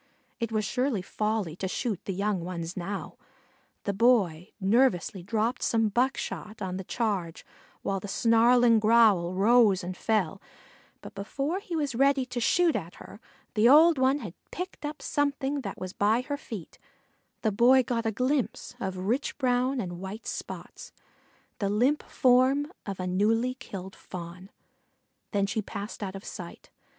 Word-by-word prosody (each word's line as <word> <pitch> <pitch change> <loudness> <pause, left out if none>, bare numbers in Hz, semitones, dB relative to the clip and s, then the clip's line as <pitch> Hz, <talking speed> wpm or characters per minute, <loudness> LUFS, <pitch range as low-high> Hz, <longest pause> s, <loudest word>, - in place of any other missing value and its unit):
It 230 -1 -2
was 215 -1 0
surely 245 -2 -1
folly 210 -6 -2
to 190 - -2
shoot 210 0 -2
at - - -49
the 195 - -2
young 200 -2 -1
ones 170 -1 -5
now. 195 +2 -5 0.7
The 200 - -1
boy 195 -6 +2
nervously 200 -3 +2
dropped 220 +5 -1
some 225 -2 +2
buckshot 235 -2 -2
on 185 -1 -3
the 190 - -5
charge 195 -6 -2 0.4
while 195 0 -1
the 205 - -7
snarling 230 +2 +4
growl 215 -5 +4
rose 210 -1 +4
and 180 +1 -5
fell, 195 -3 0 0.6
but - - -10
before 275 - -3
he 390 -5 -6
was 290 -5 -1
ready 275 +2 +3
to 250 -1 -4
shoot 340 +7 +3
at 175 -4 -4
her - - -12 0.3
the 220 +2 +5
old 315 +1 +7
one 265 +2 +3
had 195 -7 -7 0.2
picked 360 -4 -6
up 300 0 -8
something 285 -1 -1
that 200 -6 -6
was 185 0 -6
by 215 +4 +2
her 285 +3 -3
feet; 215 - -9 0.6
the 220 - +2
boy 250 +5 +5
got 230 -2 -1
a - - +1
glimpse 255 +1 -1
of 190 -4 -3
rich 245 +8 -1
brown 255 0 +1
with 190 -8 -3
white 190 +5 -7
spots - - -7 0.7
the 200 - 0
limp 250 +9 +2
form 265 +3 +3 0.2
of 195 -2 -4
a 185 - -2
newly 220 +7 +1
killed 190 -7 -8
Fawn. 180 +1 -9 0.8
Then 200 -2 +1
she 205 +2 -1
passed 205 +1 -7
out 195 -1 -4
of 195 - -9
sight. - - -9
220 Hz, 160 wpm, -28 LUFS, 195-255 Hz, 0.8 s, old